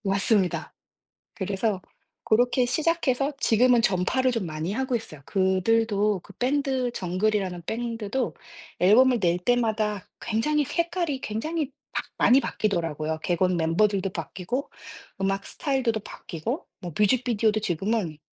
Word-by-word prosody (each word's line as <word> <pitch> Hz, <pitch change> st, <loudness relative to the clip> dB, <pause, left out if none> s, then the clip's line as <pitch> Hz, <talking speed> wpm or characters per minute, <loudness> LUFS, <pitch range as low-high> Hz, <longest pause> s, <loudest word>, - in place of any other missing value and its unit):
맞습니다. 195 Hz, -1 st, +1 dB, 0.6 s
그래서 195 Hz, 0 st, -1 dB, 0.4 s
고렇게 245 Hz, +2 st, +3 dB
시작해서 290 Hz, -1 st, +1 dB
지금은 245 Hz, 0 st, +4 dB
전파를 240 Hz, +5 st, +2 dB
좀 230 Hz, -6 st, -2 dB
많이 155 Hz, +3 st, -3 dB
하고 260 Hz, +2 st, 0 dB
있어요. 155 Hz, -10 st, -8 dB
그들도 205 Hz, +2 st, +2 dB
그 -, -, -13 dB
밴드 265 Hz, -1 st, 0 dB
정글이라는 185 Hz, -2 st, -1 dB
밴드도 230 Hz, +1 st, -2 dB, 0.5 s
앨범을 240 Hz, +6 st, +5 dB
낼 175 Hz, -2 st, +2 dB
때마다 215 Hz, -2 st, 0 dB
굉장히 290 Hz, +7 st, +1 dB
색깔이 340 Hz, -2 st, -1 dB
굉장히 295 Hz, +8 st, -3 dB, 0.2 s
막 -, -, -1 dB, 0.2 s
많이 255 Hz, +3 st, +6 dB
바뀌더라고요. 165 Hz, -, -2 dB
객원 180 Hz, +1 st, +1 dB
멤버들도 195 Hz, +4 st, +1 dB
바뀌고 185 Hz, -, -4 dB, 0.5 s
음악 195 Hz, 0 st, -1 dB
스타일들도 260 Hz, -6 st, -1 dB
바뀌고 205 Hz, -, -5 dB
뭐 175 Hz, -2 st, -6 dB
뮤직비디오도 220 Hz, -1 st, +2 dB
지금은 190 Hz, -3 st, -1 dB
215 Hz, 315 characters per minute, -26 LUFS, 185-250 Hz, 0.6 s, 많이